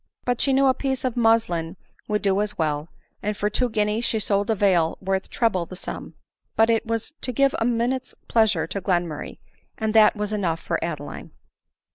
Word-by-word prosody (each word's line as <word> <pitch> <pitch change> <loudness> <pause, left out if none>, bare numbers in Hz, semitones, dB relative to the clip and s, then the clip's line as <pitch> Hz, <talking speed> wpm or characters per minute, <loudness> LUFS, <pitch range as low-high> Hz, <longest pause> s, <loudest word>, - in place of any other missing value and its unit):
But 245 -1 0
she 275 - +3
knew 270 +1 +4
a 260 - +5
piece 265 0 -2
of 250 - -1
muslin 210 -8 +2 0.3
would 210 0 -1
do 195 0 +2
as 210 0 -3
well; 150 0 -1 0.3
and 210 0 -2
for 210 +1 0
two 250 +3 +1
guineas 215 +1 0
she 225 - +1
sold 205 -1 0
a 220 - +3
veil 180 -5 +2
worth 190 0 -2
treble 190 -8 0
the 185 - -9
sum; - - -7 0.4
but 225 +1 +4
it 225 0 0
was 230 +4 -2
to 255 - -2
give 275 +3 +3
a 225 - +1
minute's 245 +2 -1
pleasure 215 -8 +3
to 185 +4 -4
Glenmurray, 175 -5 -2 0.4
and 220 -1 -1
that 220 -1 +6
was 210 0 -3
enough 175 -6 0
for 165 - -2
Adeline. 150 -4 -5
210 Hz, 195 wpm, -24 LUFS, 180-230 Hz, 0.4 s, that